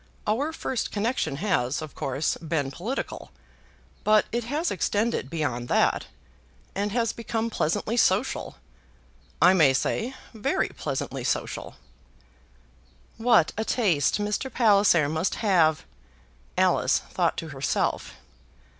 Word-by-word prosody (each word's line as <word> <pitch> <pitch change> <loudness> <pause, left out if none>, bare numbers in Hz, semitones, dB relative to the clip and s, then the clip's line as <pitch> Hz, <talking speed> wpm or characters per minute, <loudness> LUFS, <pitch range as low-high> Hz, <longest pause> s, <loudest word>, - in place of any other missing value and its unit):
Our 265 +9 0
first 265 -6 -3
connection 220 - -1
has, 140 -7 0
of 155 -2 -7
course, 140 0 -1
been 155 -4 -2
political; 215 - -5 0.7
but 215 0 +4
it 235 0 -2
has 300 +7 -1
extended 205 - 0
beyond 135 -7 -2
that, - - +2 0.7
and 205 +1 -2
has 230 0 0
become 230 0 -3
pleasantly 210 +7 -1
social; 205 +3 +1 0.8
I 185 - +7
may 155 -8 +5
say, 245 - -1 0.2
very 220 -2 0
pleasantly - - -4
social." - - -3 1.4
"What 225 -8 +4
a - - +1
taste 185 - +2
Mr. 210 +6 -2
Palliser 200 - +4
must 160 +5 -1
have!" 165 - +2 0.7
Alice - - +3
thought - - -1
to - - -5
herself. - - -1
205 Hz, 115 wpm, -26 LUFS, 155-230 Hz, 1.4 s, I